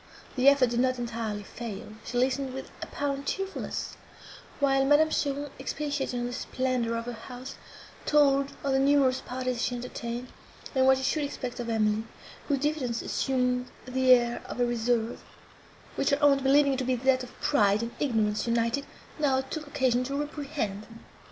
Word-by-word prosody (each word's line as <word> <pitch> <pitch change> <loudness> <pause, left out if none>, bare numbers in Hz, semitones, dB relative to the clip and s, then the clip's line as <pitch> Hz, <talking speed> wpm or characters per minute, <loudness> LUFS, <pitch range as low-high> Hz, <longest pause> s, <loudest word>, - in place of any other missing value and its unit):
The 260 +1 +7
effort 270 -4 +4
did 240 - 0
not 255 0 +2
entirely 225 -3 -3
fail; 220 -1 -7
she 245 - -4
listened 260 +1 0
with 265 - -7
apparent 280 -1 -3
cheerfulness, 390 0 -3 0.6
while 270 -1 +3
Madame 295 +3 +4
Cheron 285 -1 -1
expatiated 280 -2 -2
on 240 - -2
the 245 - -4
splendour 250 -2 -1
of 230 - -4
her 245 - -4
house, 250 +3 -8 0.5
told 280 -2 +4
of 280 - 0
the 270 - +3
numerous 275 -2 +3
parties 255 -1 -3
she 250 - 0
entertained, 240 0 -5 0.4
and 260 -1 +3
what 265 0 +6
she 265 - -4
should 300 +3 +1
expect 255 -3 -5
of 235 -1 -3
Emily, 215 -1 +1 0.4
whose 285 - +2
diffidence 270 -5 -1
assumed 250 -1 0 0.2
the 255 0 +2
air 240 -1 +2
of - - -7
a 245 - +4
reserve, 240 -1 0 0.7
which - - 0
her 280 - +3
aunt, 280 -1 +5
believing 280 +1 +4
it 265 - -2
to - - 0
be 255 0 +1
that 255 +1 +2
of 250 - -10
pride 210 -6 +3
and 235 - -4
ignorance 220 -6 +1
united, 235 +4 0 0.3
now 270 -3 +3
took 295 +3 -6
occasion 260 -4 +1
to 275 +2 -3
reprehend. 280 -9 -4
255 Hz, 170 wpm, -28 LUFS, 240-280 Hz, 0.7 s, The